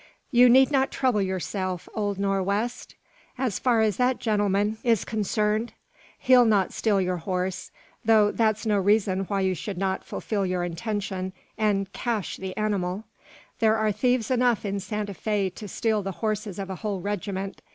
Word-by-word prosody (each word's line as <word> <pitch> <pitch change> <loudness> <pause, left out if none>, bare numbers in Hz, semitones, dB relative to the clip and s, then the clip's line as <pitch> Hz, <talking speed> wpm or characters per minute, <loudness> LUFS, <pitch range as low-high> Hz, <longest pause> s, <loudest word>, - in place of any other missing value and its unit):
"You 245 -1 +7
need 265 +3 +6
not 270 -1 +2
trouble 250 -6 +1
yourself, 185 -1 -3
old 205 -2 -1
Nor' 195 0 0
west, 210 +6 -2 0.4
as 250 -6 -1
far 240 -3 +3
as 215 -2 +1
that 250 0 +2
gentleman 205 0 0
is 230 -4 +2
concerned. 215 +1 0 0.4
He'll 255 -1 +5
not 210 -5 +2
steal 210 -3 +1
your 180 -1 0
horse; 185 +1 -3 0.3
though 215 -2 +5
that's 215 -1 +1
no 210 -2 +2
reason 195 -1 +2
why 200 0 -1
you 190 0 +1
should 190 +2 -5
not 190 0 -1
fulfil 205 -3 -3
your 180 -1 -1
intention, 190 +1 -3 0.2
and 200 -2 0
`cache' 230 -5 -2
the 190 -1 -6
animal. 200 -2 -1 0.6
There 220 -1 +4
are 215 -1 +1
thieves 245 +2 +1
enough 245 -3 +2
in 200 0 -2
Santa 210 0 -4
Fe 200 -1 -1
to 210 +3 -9
steal 220 +1 0
the 195 0 -4
horses 215 -2 -3
of 195 -1 -5
a 190 - -5
whole 205 -2 -3
regiment. 195 0 -4
205 Hz, 170 wpm, -26 LUFS, 190-220 Hz, 0.6 s, You